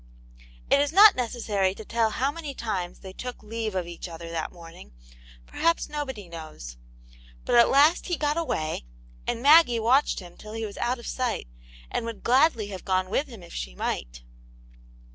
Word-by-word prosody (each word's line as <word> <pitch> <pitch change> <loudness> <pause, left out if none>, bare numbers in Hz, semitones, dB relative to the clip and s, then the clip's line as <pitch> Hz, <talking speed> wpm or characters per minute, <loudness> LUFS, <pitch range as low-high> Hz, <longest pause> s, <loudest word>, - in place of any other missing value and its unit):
It - - +6
is 285 0 +1
not 405 +4 +9
necessary 215 -6 -1
to 220 - -10
tell 230 0 +1
how 265 +6 0
many 295 -3 -7
times 190 -6 -4
they 190 -1 -9
took 250 +2 -7
leave 220 -1 -4
of 185 -2 -1
each 175 +1 -8
other 165 0 -8
that 165 -1 -3
morning; 165 - -13 0.5
perhaps 335 - 0
nobody 265 -10 -5
knows. 155 - -9 0.7
But - - -1
at 235 -1 +7
last 295 +5 +4
he 350 -3 -1
got 295 0 0
away, 160 - -2 0.4
and 235 - -2
Maggie 290 -5 +7
watched 255 +6 +3
him 175 -2 -12
till 215 0 -10
he 225 0 -3
was 205 - -8
out 250 +2 0
of 235 - -11
sight, 250 - -2 0.4
and - - -1
would 230 -2 -7
gladly 250 -4 +3
have 190 -2 -7
gone 185 -1 0
with 285 - 0
him 230 -8 -11
if 170 - -13
she - - -5
might. - - -4
225 Hz, 180 wpm, -26 LUFS, 175-270 Hz, 0.7 s, not